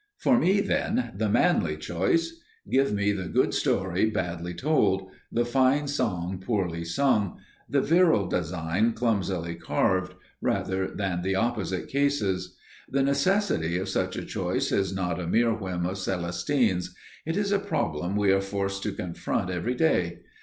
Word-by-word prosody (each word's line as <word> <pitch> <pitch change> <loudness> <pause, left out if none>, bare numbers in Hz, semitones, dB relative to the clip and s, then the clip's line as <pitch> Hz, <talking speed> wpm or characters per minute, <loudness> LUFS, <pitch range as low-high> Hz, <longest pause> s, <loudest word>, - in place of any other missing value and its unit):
For 250 -2 +3
me, 200 -3 +3
then, 240 +4 0
the 110 -1 0
manly 95 - +2
choice. 95 - -1 0.3
Give 135 -1 +2
me 100 0 +1
the 95 -3 -3
good - - +1
story 95 +3 +1
badly 90 -4 -3
told, 95 - +1 0.2
the 120 +1 +1
fine 135 +4 +2
song 95 -10 -1
poorly 95 -5 -1
sung, 105 +2 +1 0.3
the 140 - +2
virile 165 - +4
design 90 +5 0
clumsily 95 -8 -1
carved, 95 +2 0 0.3
rather 95 0 0
than 95 -3 -2
the 95 +1 0
opposite 105 -4 -1
cases. 100 -11 0 0.3
The 135 0 +1
necessity 140 - +1
of 95 +1 -3
such - - -1
a - - -4
choice - - -1
is 95 -2 +1
not 95 -2 -2
a 85 - -4
mere 115 +5 +3
whim 95 -5 -3
of 95 +2 -3
Celestine's; 90 +3 0 0.3
it 165 +3 -2
is 200 -1 0
a 200 - +3
problem 95 - -2
we 100 -2 +3
are 95 0 +3
forced 100 0 -3
to 105 - -2
confront 90 0 -3
every 90 +8 -2
day. 90 - +1
100 Hz, 155 wpm, -27 LUFS, 90-130 Hz, 0.3 s, virile